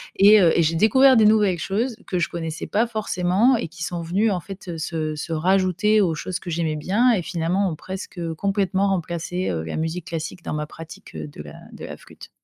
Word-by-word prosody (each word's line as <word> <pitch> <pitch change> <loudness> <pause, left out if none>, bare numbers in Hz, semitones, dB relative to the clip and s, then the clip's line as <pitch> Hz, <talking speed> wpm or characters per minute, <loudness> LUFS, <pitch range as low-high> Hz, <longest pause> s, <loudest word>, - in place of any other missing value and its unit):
et 205 +2 +7
heu 170 -3 +4
et - - +5
j'ai 160 +1 +1
découvert 255 +7 +5
des 220 - +6
nouvelles 210 -5 +3
choses 225 +6 -2
que 180 - -1
je 165 - 0
connaissais 165 -1 -5
pas 225 +3 +1
forcément 215 +2 +1
et 220 - -3
qui 165 +1 -8
sont 170 0 -3
venues 195 +6 +1
en 180 - -1
fait, 190 +3 -10
heu, 170 - -4
se 155 -1 -3
se 165 +2 -5
rajouter 185 +5 +2
aux 175 -6 +2
choses 180 +4 -4
que 180 - -8
j'aimais 160 -2 -1
bien, 210 +11 +2
et 210 -6 +1
finalement 175 +3 -1
ont 160 - -4
presque, 190 +2 -8
heu, 165 -1 -3
complètement 195 +1 0
remplacé, 180 0 -2
heu, 80 -2 -2
la 80 - -5
musique 160 +2 -3
classique 165 +2 -5
dans - - -3
ma 150 0 -2
pratique 165 +1 -12
heu 75 -1 -5
de 75 - -10
la - - -11 0.2
de - - -10
la - - -7
flûte. - - -14
180 Hz, 230 wpm, -23 LUFS, 165-200 Hz, 0.2 s, et